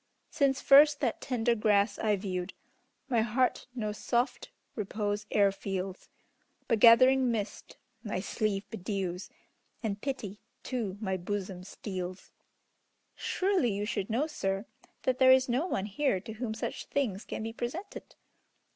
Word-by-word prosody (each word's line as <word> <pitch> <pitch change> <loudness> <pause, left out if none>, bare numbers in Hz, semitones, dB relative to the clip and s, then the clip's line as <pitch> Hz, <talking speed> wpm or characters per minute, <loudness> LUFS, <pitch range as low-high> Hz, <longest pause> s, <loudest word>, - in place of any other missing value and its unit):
Since 275 -1 +2
first 290 +1 +7
that 245 -5 -1
tender 240 -2 +1
grass 205 -2 +2
I 210 -1 +2
viewed, 185 -2 -4 0.5
My 240 -4 +2
heart 240 +3 +1
no 215 -4 -2
soft 240 +4 -1 0.2
repose 210 -1 -3
e'er 200 -1 +4
feels, 195 -1 -5 0.6
But 230 -3 +2
gathering 255 +3 +7
mist 220 -3 -4 0.3
my 210 -5 -2
sleeve 205 0 -2
bedews, 190 -3 -3 0.5
And 205 -2 -2
pity 220 -7 -4 0.2
to 220 -7 -3
my 190 -3 -1
bosom 185 0 -4
steals." 185 -1 -6 0.8
"Surely 370 - +1
you 205 +1 -2
should 200 -2 -2
know, 240 +7 +1
sir, 195 -9 -2 0.4
that 255 -1 0
there 260 -1 +7
is 260 0 +5
no 260 +8 0
one 195 - -1
here 215 0 0
to 220 +4 -8
whom 220 0 -4
such - - -4
things 225 -8 -1
can - - -5
be 225 0 -4
presented!" 315 - -6
215 Hz, 140 wpm, -30 LUFS, 195-255 Hz, 0.8 s, first